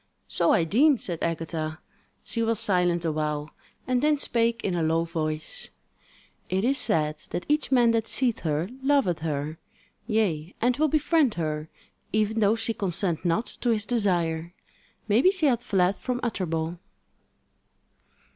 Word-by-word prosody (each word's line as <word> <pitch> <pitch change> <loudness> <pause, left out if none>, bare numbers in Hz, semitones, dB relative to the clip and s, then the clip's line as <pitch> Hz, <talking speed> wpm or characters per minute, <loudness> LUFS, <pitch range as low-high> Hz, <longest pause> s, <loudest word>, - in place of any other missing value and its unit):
"So 170 - +2
I 170 - +4
deem," 265 - +4
said 175 -6 -5
Agatha. 160 -1 -3 0.5
She 230 - -3
was 225 -1 +1
silent 180 -5 +2
awhile 150 -1 -2 0.3
and 250 -1 +1
then 300 0 +3
spake 235 -3 0
in 190 - -1
a 175 - 0
low 160 +1 +2
voice: 155 -2 -4 0.8
"It 190 +2 0
is 270 +4 +3
said 155 -1 +2
that - - -4
each 300 -1 0
man 240 -3 +5
that 225 -1 0
seeth 245 -4 +1
her 155 +1 -1
loveth 270 - +2
her; 155 0 -3 0.5
yea, 190 -8 0
and 245 +2 +2
will 310 +1 +3
befriend 300 -4 +2
her, 155 -2 -3 0.4
even 215 +1 +1
though 210 +1 +4
she 225 0 -2
consent 180 -4 -1
not 175 +7 +1 0.2
to 245 - +1
his 215 -3 +1
desire. 175 -7 0 0.5
Maybe 230 - +5
she 380 -5 +1
hath 245 -5 +3
fled 195 -5 +1
from 250 -1 -2
Utterbol." 170 -7 -2
195 Hz, 150 wpm, -26 LUFS, 165-235 Hz, 0.8 s, man